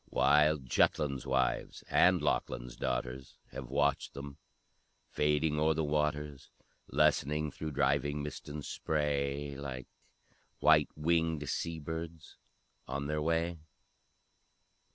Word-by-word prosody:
Wild 75 -1 +3
Jutland's 70 +2 +1
wives 65 -1 0
and 90 -3 +4
Lochlin's - - -1
daughters 65 +1 -3
Have 65 -2 -7
watched 70 +1 0
them 70 0 -8 0.7
fading 75 +1 +1
o'er 80 +1 +3
the 80 - 0
waters, 75 -1 -1 0.4
Lessening 75 +2 +2
through 80 +1 -5
driving 70 +1 +1
mist 75 - -7
and 75 0 -6
spray, 70 -2 -1
Like 65 -3 -6 0.7
white - - +5
winged 80 -1 +1
sea 85 +3 -2
birds 80 +1 -7 0.5
on 70 0 -3
their 75 +1 -1
way! 85 +1 0
75 Hz, 110 wpm, -32 LUFS, 70-75 Hz, 0.7 s, white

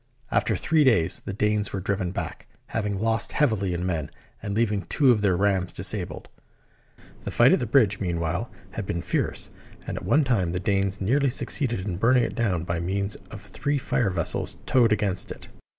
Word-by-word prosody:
After - - +2
three 160 -1 +2
days 95 - +3
the - - -6
Danes 105 +1 0
were 100 - -3
driven 95 -1 -1
back, 90 - -5 0.2
having 105 -3 -2
lost 115 +1 +1
heavily 110 -10 +1
in 90 +1 -3
men, 85 -5 -2 0.3
and 100 -1 -4
leaving 105 -3 +1
two 135 +5 +3
of 110 -4 +2
their 95 -4 +2
rams 95 -2 +1
disabled. - - -3 1.0
The - - -4
fight - - +5
at - - +4
the 120 - -2
bridge, 110 -5 +3
meanwhile, 85 +3 -2 0.2
had 105 -1 -5
been 85 0 -2
fierce; 90 - -2 0.3
and - - -4
at - - -6
one 150 +2 +3
time 100 -10 +1
the 90 - -1
Danes 100 0 0
nearly 135 +8 +2
succeeded 120 -3 0
in 95 -3 -4
burning 125 +4 +4
it - - -2
down 95 -8 0
by 85 -1 -2
means 100 +3 -1
of 105 - -9
three 145 +8 -2
fire 120 -4 0
vessels 85 -3 -1
towed 120 -4 +3
against 100 -3 0
it. - - -9
100 Hz, 190 wpm, -25 LUFS, 95-115 Hz, 1.0 s, fight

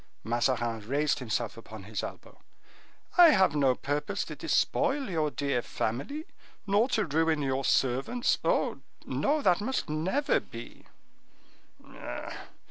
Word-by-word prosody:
Mazarin 120 0 0
raised 140 +7 0
himself 115 -2 -2
upon 110 -3 -10
his 105 +2 -4
elbow. - - -9 0.8
"I 350 - +11
have 190 - +4
no 135 -3 +3
purpose 145 +3 -2
to - - -7
despoil 275 0 +1
your 160 -5 0
dear 140 -4 -1
family, 140 - -3 0.4
nor 205 +5 +3
to 215 -4 +1
ruin 160 0 +1
your 135 0 0
servants. 135 - +1
Oh, - - +1 0.3
no, 295 +1 0
that 180 +1 +3
must 260 -3 -2
never 185 - +1
be!" 115 +1 -11
145 Hz, 125 wpm, -29 LUFS, 120-205 Hz, 0.8 s, I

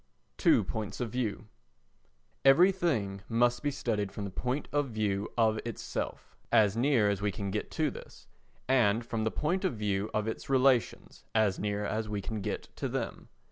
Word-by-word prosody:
Two - - +4
Points 110 -2 -4
of 120 -3 -2
View 115 -3 -2 1.0
Everything 135 - +4
must 120 +1 +2
be 145 - 0
studied 110 -7 -2
from 105 - -6
the 100 - -4
point 125 +8 -2
of 145 -2 0
view 105 -2 -1
of 110 -2 +3
itself, 115 -3 -5 0.2
as 105 -2 +4
near 120 -3 +3
as 100 -1 0
we 105 0 +1
can 100 -1 -4
get 105 - -3
to 155 -3 0
this, - - -12 0.4
and 120 -3 +3
from 115 -2 -2
the - - +2
point 175 - -1
of 185 -10 0
view 105 -1 -1
of 105 0 -1
its 110 - -5
relations, 130 -2 +2
as 105 -4 +3
near 105 0 -1
as 110 0 -2
we 105 -1 -2
can 105 +2 -4
get - - -5
to - - -2
them. - - -4
110 Hz, 180 wpm, -30 LUFS, 105-130 Hz, 1.0 s, Two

